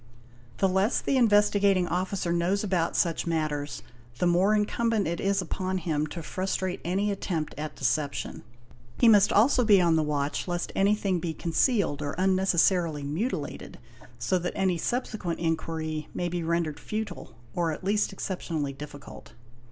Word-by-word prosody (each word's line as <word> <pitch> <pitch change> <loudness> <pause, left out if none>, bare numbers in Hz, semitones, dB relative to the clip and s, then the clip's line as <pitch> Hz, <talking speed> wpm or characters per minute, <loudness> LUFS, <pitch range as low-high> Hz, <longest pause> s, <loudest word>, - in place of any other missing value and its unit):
The 195 - +3
less 190 +5 +2
the 275 - 0
Investigating 205 -5 +4
'Officer 180 0 -1
knows 180 +4 +1
about 180 -5 0
such 170 -1 +1
matters 155 -3 -2 0.3
the 180 - 0
more 180 +4 +3
incumbent 220 0 +1
is 195 +4 0
it - - -8
upon 185 +2 -2
him 155 -4 -1
to 170 +1 -7
frustrate 185 +1 -2
any 195 +4 0
attempt 170 -5 -3
at 150 0 -5
deception. 140 +2 -2 0.6
He 235 - +4
must 205 -3 +6
also 245 +4 +4
be 210 -4 +6
on 170 -2 +3
the - - +3
watch 150 0 -1
lest 175 -1 -2
anything 195 -2 +2
be 165 -2 -4
concealed 170 - +1
or 145 -1 -3
unnecessarily 185 -4 +2
mutilated, 150 - -4 0.4
so 185 +9 0
that 175 +1 -3
any 185 -3 +1
subsequent 215 -6 -2
inquiry 160 -2 -2
may 175 - -1
be 175 0 -2
rendered 165 -2 -1
futile 215 - -5 0.2
or 170 -2 0
at 155 - -6
least 205 +3 +1
exceptionally 165 -7 -3
difficult. 145 -3 -11
180 Hz, 150 wpm, -27 LUFS, 160-200 Hz, 0.6 s, must